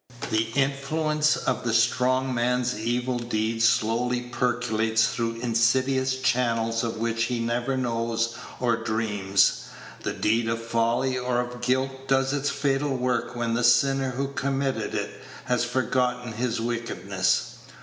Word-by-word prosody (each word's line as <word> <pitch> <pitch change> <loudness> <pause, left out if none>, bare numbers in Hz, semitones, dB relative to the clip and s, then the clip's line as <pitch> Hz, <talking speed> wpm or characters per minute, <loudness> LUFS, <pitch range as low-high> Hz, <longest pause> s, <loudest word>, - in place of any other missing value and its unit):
The 110 +1 +2
influence 150 +2 +1
of 130 - -2
the 115 -2 0
strong 130 +3 +2
man's 125 +1 0
evil 120 +3 -1
deed 115 -1 -1
slowly 115 +2 +2
percolates 120 -2 +1
through 115 -1 -2
insidious 130 +3 +2
channels 115 -2 +1
of 115 -1 -3
which 115 0 0
he 120 0 -2
never 120 +3 -1
knows 115 -2 -1 0.2
or 120 -2 +2
dreams. 110 -3 +1 0.4
The - - -2
deed 115 +1 +1
of 115 0 -1
folly 115 +3 0
or 125 -1 0
of 125 0 -4
guilt 130 +2 -1
does 135 0 +2
its 145 0 0
fatal 140 -1 0
work 125 -1 -1
when 120 -1 -1
the 120 +1 0
sinner 135 +3 +4
who 135 +2 -2
committed 135 -5 -2
it - - -4 0.2
has 125 -1 +1
forgotten 125 -1 -1
his 115 +1 -1
wickedness. 115 -5 -1
120 Hz, 140 wpm, -25 LUFS, 115-130 Hz, 0.4 s, sinner